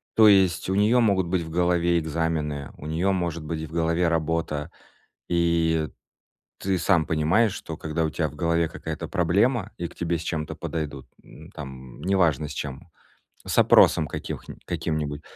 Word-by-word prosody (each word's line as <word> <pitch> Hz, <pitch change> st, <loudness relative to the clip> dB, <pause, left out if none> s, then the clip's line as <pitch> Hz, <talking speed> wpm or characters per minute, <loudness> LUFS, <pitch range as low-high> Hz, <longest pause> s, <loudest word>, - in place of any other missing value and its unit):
То 110 Hz, -1 st, +7 dB
есть 95 Hz, -3 st, +3 dB
у 95 Hz, -, +1 dB
неё 110 Hz, +5 st, +4 dB
могут 100 Hz, -5 st, +2 dB
быть 90 Hz, 0 st, 0 dB
в 80 Hz, -, -8 dB
голове 85 Hz, 0 st, +2 dB
экзамены, 80 Hz, -3 st, -2 dB
у 75 Hz, -, -10 dB
неё 85 Hz, +5 st, 0 dB
может 85 Hz, -3 st, -2 dB
быть 80 Hz, 0 st, -4 dB
в 80 Hz, -, -14 dB
голове 85 Hz, +1 st, +1 dB
работа, 80 Hz, -1 st, -1 dB, 0.6 s
и 85 Hz, -2 st, +1 dB, 0.7 s
ты 95 Hz, -1 st, 0 dB
сам 85 Hz, -2 st, +3 dB
понимаешь, 85 Hz, +8 st, +2 dB
что -, -, -7 dB
когда 80 Hz, +1 st, -2 dB
у 80 Hz, -, 0 dB
тя 80 Hz, 0 st, -1 dB
в 75 Hz, -, -11 dB
голове 85 Hz, +1 st, +1 dB
какая-то 80 Hz, 0 st, -6 dB
проблема 100 Hz, -, +1 dB
и 85 Hz, -, -3 dB
к -, -, -15 dB
тебе 85 Hz, 0 st, -1 dB
с 80 Hz, -, -7 dB
чем-то 75 Hz, -3 st, -3 dB
подойдут, 75 Hz, -5 st, -5 dB, 0.2 s
м, 80 Hz, +4 st, -14 dB
там 65 Hz, -6 st, -9 dB
неважно 85 Hz, -5 st, +2 dB
с -, -, -6 dB
чем, 70 Hz, +3 st, -6 dB, 0.6 s
с -, -, -2 dB
опросом 80 Hz, -, +6 dB
каких -, -, -6 dB
нь -, -, -9 dB
каким-нибудь. 75 Hz, -2 st, -2 dB
85 Hz, 170 wpm, -25 LUFS, 75-90 Hz, 0.7 s, То